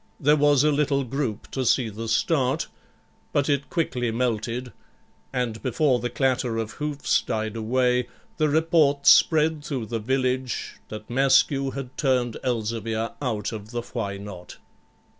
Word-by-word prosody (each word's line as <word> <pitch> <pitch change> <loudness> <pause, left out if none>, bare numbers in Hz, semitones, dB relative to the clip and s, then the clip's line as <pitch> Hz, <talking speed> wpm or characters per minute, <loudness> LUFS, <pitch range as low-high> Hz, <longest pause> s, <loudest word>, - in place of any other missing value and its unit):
There 150 +1 +4
was 145 -2 +4
a 150 - +4
little 140 -1 +1
group 125 -4 -4
to 130 - -2
see 125 0 +2
the 110 +2 -6
start, 130 +5 +1 0.7
but 140 -2 +1
it 140 -1 0
quickly 125 -8 -1
melted; 120 +1 -2 0.6
and 115 -3 -2
before 130 0 +2
the 120 - -2
clatter 125 -2 0
of 115 -1 -3
hoofs 150 +1 0
died 110 -1 -3
away, 125 +2 +1 0.3
the 155 -1 +2
report 150 -2 +2
spread 155 -1 +5
through 135 -7 -3
the 115 +1 -3
village 130 +2 -1
that 110 0 -8
Maskew 135 +2 +3
had 135 -2 -6
turned 125 -4 +1
Elzevir 115 -2 -2
out 110 -6 -2
of 110 -2 -7
the 120 0 -4
Why 105 -5 -4
Not? 100 -3 -9
125 Hz, 145 wpm, -25 LUFS, 115-140 Hz, 0.7 s, spread